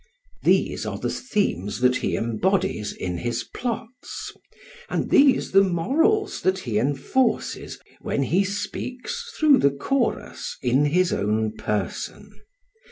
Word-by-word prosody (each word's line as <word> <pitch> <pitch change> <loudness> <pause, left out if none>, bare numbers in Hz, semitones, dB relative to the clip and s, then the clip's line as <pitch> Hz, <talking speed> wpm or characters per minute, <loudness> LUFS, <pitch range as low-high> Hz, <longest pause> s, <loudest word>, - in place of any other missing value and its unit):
These - - +2
are - - -3
the - - -2
themes 160 - -1
that 125 0 +4
he - - -1
embodies 115 - 0
in 90 -2 -4
his 120 +2 -2
plots, 245 0 -6 0.6
and - - -2
these 275 -2 +5
the 195 - +7
morals 290 - +1
that 185 0 +2
he 120 - -1
enforces 145 - 0 0.2
when 140 - -1
he 180 +9 +2
speaks 250 - -4
through 300 -3 +6
the 140 - +5
chorus 235 - -2
in 130 +4 +3
his 175 +4 +2
own 110 +2 0
person. 105 -2 -4
180 Hz, 125 wpm, -24 LUFS, -, 0.6 s, the